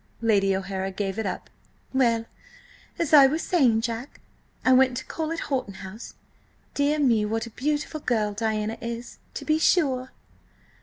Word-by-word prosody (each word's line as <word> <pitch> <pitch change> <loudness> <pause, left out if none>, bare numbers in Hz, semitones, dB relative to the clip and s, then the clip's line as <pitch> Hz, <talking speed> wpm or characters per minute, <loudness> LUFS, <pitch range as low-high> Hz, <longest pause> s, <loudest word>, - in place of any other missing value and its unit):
Lady 200 -4 +3
O'Hara 190 0 -3
gave 195 +1 -3
it 220 - -1
up. 185 - -5 0.5
"Well, 235 -4 +2 0.7
as 330 -2 -1
I 280 -3 +9
was 310 +4 -1
saying, 250 -11 +3
Jack, 230 +3 -5 0.5
I 255 - +6
went 255 -1 +4
to 260 - -5
call 320 -1 -4
at 330 - -3
Horton 255 -8 -2
House. 195 +5 -9 0.6
Dear 290 +1 +1
me, 240 -7 +3
what 225 +2 -1
a 230 - -10
beautiful 300 +5 -2
girl 215 -7 0
Diana 220 0 -2
is, 235 0 -6 0.2
to - - -5
be 310 0 +2
sure!" 265 -7 +2
235 Hz, 160 wpm, -25 LUFS, 215-280 Hz, 0.7 s, I